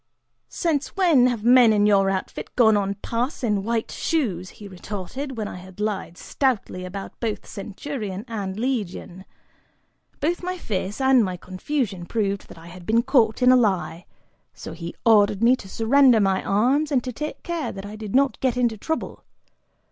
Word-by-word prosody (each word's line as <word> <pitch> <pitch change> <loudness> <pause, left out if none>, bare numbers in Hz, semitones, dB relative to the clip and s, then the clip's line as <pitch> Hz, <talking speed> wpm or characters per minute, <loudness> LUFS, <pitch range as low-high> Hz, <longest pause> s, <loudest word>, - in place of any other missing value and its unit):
"Since 310 -4 -1
when 330 -10 +5
have 235 -4 -2
men 245 -1 +6
in 205 -1 +3
your 195 -2 +4
outfit 190 -1 -4
gone 220 -3 +5
on 200 -1 0
pass 245 +5 -2
in 210 -4 +1
white 225 +1 -2
shoes?" 195 - -1
he 205 - -12
retorted, 205 +8 -6
when 215 -2 -2
I - - -7
had 185 +1 -13
lied 205 -4 -3
stoutly 220 -9 -1
about 195 +2 -8
both 225 -3 -3
centurion 210 -1 -6
and 200 -4 -4
legion. 205 -7 -3 0.9
Both 335 +4 -1
my 365 +1 -3
face 200 - -4
and 265 -2 +5
my 185 -2 -3
confusion 185 0 -3
proved 200 -3 -2
that - - -13
I 165 - -13
had 175 0 -12
been 230 +2 +3
caught 245 -3 +2
in 250 - +7
a - - +7
lie, 180 -8 0 0.5
so - - -8
he 170 0 -7
ordered 210 -2 +4
me 245 +2 +6
to 195 - -12
surrender 245 +3 +4
my 195 -2 +1
arms 265 +9 +1
and 255 -4 +2
to 255 - -5
take 300 +5 -6
care 340 -3 -3
that 195 0 -8
I 205 +1 -8
did 215 -1 -6
not 270 -3 +2
get 255 -2 0
into 235 -4 0
trouble. 320 +7 -4
220 Hz, 180 wpm, -23 LUFS, 195-255 Hz, 0.9 s, in